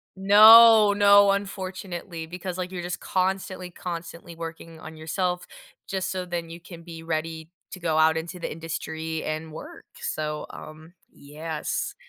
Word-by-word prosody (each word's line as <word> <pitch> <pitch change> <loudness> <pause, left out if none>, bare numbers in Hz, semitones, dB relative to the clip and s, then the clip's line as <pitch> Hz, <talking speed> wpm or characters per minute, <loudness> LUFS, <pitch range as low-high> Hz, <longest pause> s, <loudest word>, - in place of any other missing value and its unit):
No, 215 +2 +8
no, 200 0 +6
unfortunately, 185 -4 -5
because, 180 +1 -6
like, 185 0 -4
you're 175 -2 -5
just 175 -1 -4
constantly, 185 -1 -2
constantly 170 0 -8
working 165 0 -9
on 160 - -10
yourself 180 +3 -3 0.4
just 190 -1 -3
so 185 -1 -4
then 170 -2 -5
you 170 +1 -9
can 170 -2 -12
be 165 -1 -10
ready 160 0 -4 0.2
to 185 - -8
go 165 -3 -1
out 160 0 +4
into 170 +3 -5
the - - -5
industry 160 0 -5
and 155 +1 -4
work, 155 - -11
so, 150 -1 -4
um, 155 +2 -12 0.2
yes, 150 +2 -5
170 Hz, 150 wpm, -25 LUFS, 160-185 Hz, 0.4 s, No